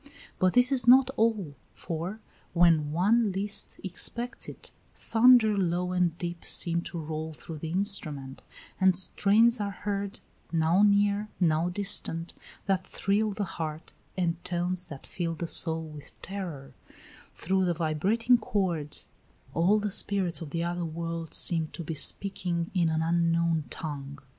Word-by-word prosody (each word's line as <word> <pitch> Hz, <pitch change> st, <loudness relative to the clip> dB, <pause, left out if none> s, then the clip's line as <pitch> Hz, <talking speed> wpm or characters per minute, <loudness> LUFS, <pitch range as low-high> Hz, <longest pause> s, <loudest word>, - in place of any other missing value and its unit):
But 185 Hz, -1 st, +3 dB
this 245 Hz, +2 st, +5 dB
is 250 Hz, -3 st, +3 dB
not 260 Hz, +1 st, +7 dB
all; 215 Hz, -9 st, 0 dB, 0.2 s
for, 175 Hz, +6 st, -5 dB, 0.3 s
when 165 Hz, -4 st, +4 dB
one 205 Hz, +6 st, +2 dB
least 200 Hz, +2 st, -1 dB
expects 235 Hz, +6 st, -2 dB
it, -, -, -10 dB, 0.2 s
thunder 230 Hz, -2 st, +5 dB
low 180 Hz, -1 st, 0 dB
and 180 Hz, -2 st, 0 dB
deep 175 Hz, -1 st, -5 dB
seems 170 Hz, 0 st, 0 dB
to 170 Hz, -1 st, -6 dB
roll 160 Hz, 0 st, -5 dB
through 155 Hz, +1 st, -9 dB
the 160 Hz, -, -5 dB
instrument; 160 Hz, -8 st, +1 dB, 0.4 s
and 190 Hz, -1 st, +4 dB
strains 215 Hz, +5 st, +3 dB
are 205 Hz, -1 st, -2 dB
heard, 200 Hz, +1 st, -4 dB, 0.3 s
now 165 Hz, +3 st, +2 dB
near, 205 Hz, 0 st, +3 dB
now 165 Hz, -1 st, +2 dB
distant, 180 Hz, -3 st, -2 dB, 0.3 s
that 190 Hz, -2 st, 0 dB
thrill 210 Hz, +2 st, 0 dB
the 205 Hz, +1 st, -3 dB
heart, 160 Hz, -3 st, -6 dB, 0.2 s
and 170 Hz, -2 st, -1 dB
tones 180 Hz, +1 st, -1 dB
that 145 Hz, -4 st, -10 dB
fill 170 Hz, -2 st, -4 dB
the 170 Hz, +1 st, -4 dB
soul 160 Hz, 0 st, +3 dB
with 150 Hz, -2 st, -11 dB
terror; 175 Hz, -9 st, -6 dB, 0.6 s
through 190 Hz, +2 st, 0 dB
the 175 Hz, -1 st, 0 dB
vibrating 195 Hz, +10 st, +2 dB
chords 175 Hz, -9 st, -2 dB, 0.5 s
all 180 Hz, +6 st, +3 dB
the 210 Hz, -1 st, -2 dB
spirits 190 Hz, -3 st, 0 dB
of 160 Hz, -, -6 dB
the 165 Hz, +3 st, -2 dB
other 175 Hz, 0 st, -2 dB
world 165 Hz, 0 st, -5 dB
seem 165 Hz, -2 st, +3 dB
to 170 Hz, -, -6 dB
be 160 Hz, -, -4 dB
speaking 170 Hz, +1 st, 0 dB
in 175 Hz, -4 st, +2 dB
an 160 Hz, 0 st, 0 dB
unknown 165 Hz, -1 st, +1 dB
tongue. 140 Hz, -2 st, -6 dB
175 Hz, 150 wpm, -28 LUFS, 165-200 Hz, 0.6 s, not